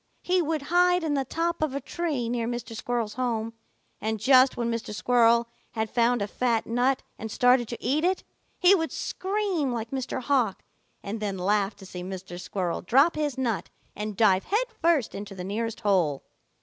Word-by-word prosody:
He 365 Hz, 0 st, +2 dB
would 310 Hz, -2 st, -1 dB
hide 360 Hz, 0 st, +4 dB
in 310 Hz, -2 st, 0 dB
the 275 Hz, -1 st, +1 dB
top 335 Hz, +4 st, -2 dB
of 300 Hz, -3 st, 0 dB
a -, -, 0 dB
tree 300 Hz, -8 st, -2 dB
near 235 Hz, -1 st, -1 dB
Mr. 240 Hz, -1 st, -5 dB
Squirrel's 230 Hz, -2 st, -2 dB
home, 230 Hz, -3 st, -2 dB, 0.5 s
and 220 Hz, +1 st, -2 dB
just 260 Hz, +3 st, +5 dB
when 235 Hz, -1 st, -1 dB
Mr. 230 Hz, -2 st, -4 dB
Squirrel 235 Hz, 0 st, +4 dB, 0.3 s
had 220 Hz, -1 st, -2 dB
found 235 Hz, -2 st, +2 dB
a -, -, -3 dB
fat 235 Hz, +1 st, 0 dB
nut 250 Hz, +3 st, +1 dB, 0.2 s
and 220 Hz, -, -5 dB
started 245 Hz, +1 st, +3 dB
to 235 Hz, -, -5 dB
eat 300 Hz, +4 st, 0 dB
it, 370 Hz, +1 st, +1 dB, 0.3 s
he 365 Hz, +1 st, +6 dB
would 325 Hz, -4 st, +1 dB
scream 380 Hz, -8 st, -1 dB
like 230 Hz, -1 st, -4 dB
Mr. 265 Hz, -1 st, -3 dB
Hawk 250 Hz, -6 st, 0 dB, 0.4 s
and 210 Hz, +3 st, -4 dB
then 200 Hz, -2 st, -3 dB
laugh 200 Hz, +2 st, +1 dB
to 195 Hz, -, -13 dB
see 180 Hz, -1 st, -7 dB
Mr. 180 Hz, -1 st, -7 dB
Squirrel 180 Hz, -4 st, -2 dB
drop 275 Hz, -, +4 dB
his 295 Hz, -4 st, -1 dB
nut 240 Hz, -6 st, -1 dB, 0.3 s
and 210 Hz, -1 st, -5 dB
dive 195 Hz, -4 st, +4 dB
headfirst 370 Hz, -, +1 dB
into 200 Hz, 0 st, -7 dB
the 180 Hz, -, -6 dB
nearest 225 Hz, +4 st, -3 dB
hole. 180 Hz, -10 st, +1 dB
240 Hz, 185 wpm, -26 LUFS, 210-290 Hz, 0.5 s, he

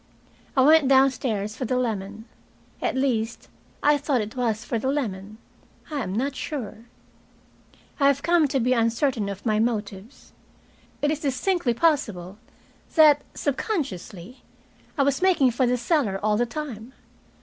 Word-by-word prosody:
I -, -, +6 dB
went 305 Hz, +1 st, +6 dB
downstairs 255 Hz, -6 st, +2 dB
for 255 Hz, -, -4 dB
the 250 Hz, +2 st, 0 dB
lemon. 215 Hz, -3 st, -3 dB, 0.6 s
At -, -, -1 dB
least, 240 Hz, -4 st, -1 dB, 0.3 s
I 295 Hz, 0 st, +4 dB
thought 280 Hz, -3 st, 0 dB
it 215 Hz, +2 st, -5 dB
was 235 Hz, -2 st, -1 dB
for 235 Hz, -, -2 dB
the 260 Hz, -, -3 dB
lemon. 215 Hz, -7 st, -3 dB, 0.5 s
I 290 Hz, -2 st, -2 dB
am 185 Hz, -, -4 dB
not 260 Hz, +7 st, -2 dB
sure. 230 Hz, -8 st, -6 dB, 1.1 s
I 275 Hz, -, +4 dB
have 280 Hz, 0 st, +2 dB
come 340 Hz, -2 st, +3 dB
to 270 Hz, 0 st, 0 dB
be 250 Hz, +1 st, +2 dB
uncertain 230 Hz, -1 st, 0 dB
of 200 Hz, +2 st, -7 dB
my 215 Hz, -2 st, +1 dB
motives. 215 Hz, 0 st, -4 dB, 0.7 s
It 295 Hz, -, +3 dB
is 305 Hz, -, -2 dB
distinctly 280 Hz, -1 st, 0 dB
possible 215 Hz, -, 0 dB, 0.6 s
that, 300 Hz, -3 st, +6 dB
sub 285 Hz, -2 st, -1 dB
consciously, 245 Hz, -, -5 dB, 0.6 s
I 280 Hz, -, +3 dB
was 275 Hz, +2 st, 0 dB
making 340 Hz, -9 st, +4 dB
for 245 Hz, +2 st, +1 dB
the 250 Hz, +1 st, +1 dB
cellar 240 Hz, -, 0 dB
all 210 Hz, 0 st, +2 dB
the 240 Hz, +3 st, +1 dB
time. 250 Hz, -3 st, -7 dB
250 Hz, 150 wpm, -24 LUFS, 215-280 Hz, 1.1 s, I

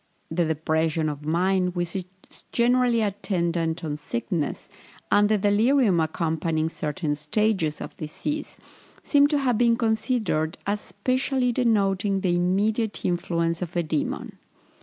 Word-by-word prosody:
The 170 Hz, +1 st, +1 dB
depression 160 Hz, 0 st, 0 dB
of 150 Hz, 0 st, -6 dB
mind 180 Hz, +2 st, +1 dB
which 175 Hz, 0 st, -2 dB
is 185 Hz, -2 st, -2 dB, 0.5 s
generally 245 Hz, -1 st, +3 dB
attendant 170 Hz, -5 st, -1 dB
on 150 Hz, -2 st, -3 dB
sickness, 145 Hz, +2 st, -3 dB, 0.4 s
and 205 Hz, 0 st, +5 dB
the 215 Hz, -, +3 dB
delirium 210 Hz, 0 st, +3 dB
accompanying 160 Hz, 0 st, 0 dB
certain 155 Hz, 0 st, -2 dB
stages 170 Hz, 0 st, 0 dB
of -, -, -7 dB
disease, 295 Hz, -, -4 dB, 0.5 s
seem 285 Hz, -1 st, +5 dB
to 295 Hz, 0 st, +1 dB
have 255 Hz, -5 st, +1 dB
been 235 Hz, -1 st, +4 dB
considered 220 Hz, -8 st, 0 dB
as 205 Hz, +1 st, 0 dB
especially 255 Hz, +2 st, 0 dB
denoting 200 Hz, -5 st, +1 dB
the 180 Hz, -2 st, +1 dB
immediate 205 Hz, +5 st, 0 dB
influence 170 Hz, -1 st, 0 dB
of 180 Hz, -1 st, -5 dB
a 175 Hz, -, +1 dB
demon. 155 Hz, -2 st, -3 dB
185 Hz, 130 wpm, -25 LUFS, 160-220 Hz, 0.5 s, and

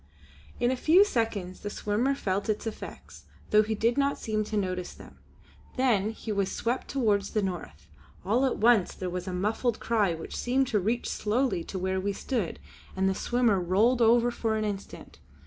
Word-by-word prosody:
In 240 Hz, -, +2 dB
a -, -, +1 dB
few 335 Hz, +10 st, +5 dB
seconds 215 Hz, -, -2 dB
the 205 Hz, -, -5 dB
swimmer 220 Hz, +7 st, 0 dB
felt 200 Hz, -4 st, -2 dB
its 215 Hz, +1 st, -1 dB
effects, 225 Hz, -, -8 dB, 0.3 s
though 215 Hz, -, +7 dB
he 220 Hz, +1 st, -2 dB
did 230 Hz, +5 st, +1 dB
not 280 Hz, 0 st, +1 dB
seem 215 Hz, -1 st, -1 dB
to 215 Hz, 0 st, -3 dB
notice 185 Hz, -2 st, -2 dB
them. -, -, -14 dB, 0.6 s
Then 225 Hz, -6 st, +2 dB
he 220 Hz, 0 st, -6 dB
was 200 Hz, -2 st, 0 dB
swept 240 Hz, +3 st, -2 dB
towards 210 Hz, -7 st, +1 dB
the 215 Hz, -, 0 dB
north. 180 Hz, -3 st, -5 dB, 0.4 s
All 230 Hz, +7 st, +2 dB
at -, -, -2 dB
once 225 Hz, -3 st, +3 dB
there 185 Hz, -1 st, -4 dB
was 180 Hz, +1 st, -4 dB
a -, -, -2 dB
muffled 215 Hz, +5 st, -1 dB
cry 210 Hz, -7 st, +1 dB
which 165 Hz, -, -8 dB
seemed 260 Hz, +2 st, +1 dB
to 210 Hz, -, +2 dB
reach 225 Hz, +6 st, -1 dB
slowly 220 Hz, -4 st, 0 dB
to 190 Hz, -, -5 dB
where 190 Hz, +1 st, -1 dB
we 200 Hz, +2 st, -1 dB
stood, 220 Hz, -3 st, -3 dB, 0.4 s
and 190 Hz, 0 st, +1 dB
the 190 Hz, -, +2 dB
swimmer 240 Hz, -1 st, +1 dB
rolled 215 Hz, +8 st, +2 dB
over 235 Hz, +1 st, +5 dB
for 225 Hz, -2 st, -1 dB
an 215 Hz, -, -1 dB
instant. 200 Hz, -2 st, -7 dB
215 Hz, 190 wpm, -28 LUFS, 195-240 Hz, 0.6 s, though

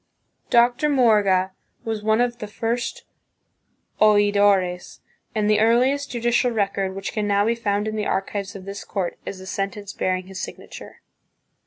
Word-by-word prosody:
Dr. 245 Hz, +5 st, +3 dB
Morga 205 Hz, -8 st, +3 dB, 0.3 s
was 220 Hz, -2 st, -3 dB
one 220 Hz, +2 st, +2 dB
of 240 Hz, -1 st, -1 dB
the 210 Hz, -, -5 dB
first 230 Hz, +3 st, -3 dB, 1.0 s
oidores, 205 Hz, -4 st, +3 dB, 0.4 s
and 210 Hz, -1 st, +1 dB
the 210 Hz, 0 st, +3 dB
earliest 255 Hz, +6 st, +2 dB
judicial 240 Hz, +1 st, +1 dB
record 200 Hz, -4 st, -1 dB
which 195 Hz, 0 st, -5 dB
can 210 Hz, -1 st, -1 dB
now 200 Hz, 0 st, +2 dB
be 230 Hz, -, +2 dB
found 210 Hz, -2 st, -1 dB
in 215 Hz, -, -3 dB
the 210 Hz, -1 st, -2 dB
archives 200 Hz, +1 st, -3 dB
of 190 Hz, -1 st, -9 dB
this 200 Hz, 0 st, -7 dB
court 190 Hz, -4 st, -4 dB
is 195 Hz, -, -5 dB
a 190 Hz, -, -10 dB
sentence 195 Hz, +1 st, -4 dB
bearing 185 Hz, 0 st, -1 dB
his 190 Hz, 0 st, -7 dB
signature. -, -, -9 dB
210 Hz, 155 wpm, -23 LUFS, 195-230 Hz, 1.0 s, Dr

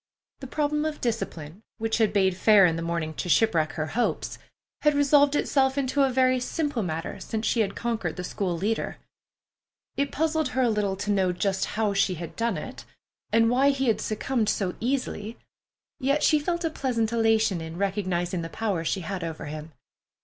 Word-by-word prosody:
The 265 Hz, -, -7 dB
problem 300 Hz, +2 st, 0 dB
of 310 Hz, -1 st, -3 dB
discipline, 175 Hz, -7 st, -4 dB, 0.2 s
which 225 Hz, +1 st, -1 dB
had 220 Hz, -2 st, +3 dB
bade 190 Hz, -3 st, +2 dB
fair 200 Hz, +1 st, +6 dB
in 165 Hz, -2 st, +2 dB
the 165 Hz, -, -3 dB
morning 165 Hz, -2 st, -2 dB
to 175 Hz, -, -4 dB
shipwreck 165 Hz, -6 st, +3 dB
her 155 Hz, -, -2 dB
hopes, 245 Hz, -, -1 dB, 0.4 s
had 300 Hz, -1 st, +3 dB
resolved 285 Hz, 0 st, +4 dB
itself 265 Hz, -2 st, +2 dB
into 280 Hz, +1 st, +1 dB
a 270 Hz, -, +4 dB
very 255 Hz, 0 st, +3 dB
simple 290 Hz, -1 st, -2 dB
matter 165 Hz, -3 st, -4 dB
since 220 Hz, 0 st, -4 dB
she 235 Hz, -, +1 dB
had 200 Hz, -3 st, 0 dB
conquered 225 Hz, -8 st, -2 dB
the 180 Hz, -, -5 dB
school 180 Hz, -1 st, -2 dB
leader. 215 Hz, +6 st, -2 dB, 1.0 s
It 280 Hz, 0 st, 0 dB
puzzled 315 Hz, -1 st, 0 dB
her 260 Hz, -, +4 dB
a 240 Hz, -, +3 dB
little 205 Hz, -2 st, 0 dB
to 205 Hz, +2 st, -2 dB
know 190 Hz, -2 st, +2 dB
just 190 Hz, +2 st, 0 dB
how 215 Hz, -2 st, +1 dB
she 195 Hz, -1 st, +2 dB
had 170 Hz, -1 st, -7 dB
done 230 Hz, -5 st, 0 dB
it, 255 Hz, +12 st, -7 dB, 0.5 s
and 230 Hz, 0 st, +4 dB
why 260 Hz, +4 st, +4 dB
he 270 Hz, -1 st, 0 dB
had 220 Hz, -, +1 dB
succumbed 220 Hz, 0 st, -1 dB
so 185 Hz, -3 st, 0 dB
easily, 235 Hz, -3 st, -2 dB, 0.6 s
yet 280 Hz, +2 st, +1 dB
she 305 Hz, -, +4 dB
felt 340 Hz, +3 st, -2 dB
a 325 Hz, -, 0 dB
pleasant 235 Hz, -7 st, -1 dB
elation 220 Hz, -5 st, +2 dB
in 160 Hz, +1 st, -7 dB
recognizing 185 Hz, -3 st, -1 dB
the 165 Hz, -, -5 dB
power 200 Hz, -4 st, -2 dB
she 190 Hz, +3 st, -1 dB
had 180 Hz, +1 st, -4 dB
over 165 Hz, -1 st, -5 dB
him. 155 Hz, +1 st, -7 dB
220 Hz, 190 wpm, -26 LUFS, 180-265 Hz, 1.0 s, fair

